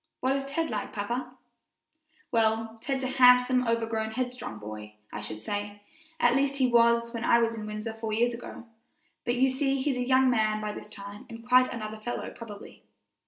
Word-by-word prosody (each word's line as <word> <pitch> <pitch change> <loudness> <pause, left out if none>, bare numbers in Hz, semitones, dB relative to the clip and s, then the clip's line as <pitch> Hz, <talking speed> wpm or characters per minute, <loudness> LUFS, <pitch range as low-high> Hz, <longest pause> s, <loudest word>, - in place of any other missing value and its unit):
What 260 +2 +1
is 275 0 -3
Ted 320 +2 -2
like, 210 -2 -4
papa?" 240 +5 -3 1.0
"Well, 225 -1 +1
Ted's 270 0 -2
a - - 0
handsome, 250 -1 +5
overgrown, 225 -1 -1
headstrong 250 - -4
boy, 105 0 -8 0.2
I 105 - -4
should 110 0 -6
say 205 - -4 0.4
at 240 +1 +4
least, 275 +1 +2
he 265 -2 +3
was 235 0 +4
when 230 -1 -4
I 235 - +5
was 230 -1 +2
in 215 -2 -6
Windsor 215 +1 -4
four 225 0 -5
years 235 +3 +2
ago; 235 0 -8 0.6
but 240 0 +1
you 260 +2 +4
see 270 +1 0
he's 265 -1 0
a 250 - 0
young 260 0 +5
man 215 -3 +2
by 210 0 -3
this 210 - -9
time 205 0 -9
and 230 +1 -10
quite 255 +1 +5
another 215 -2 -6
fellow 240 +2 -4
probably." 215 -3 -11
230 Hz, 190 wpm, -28 LUFS, 215-255 Hz, 1.0 s, handsome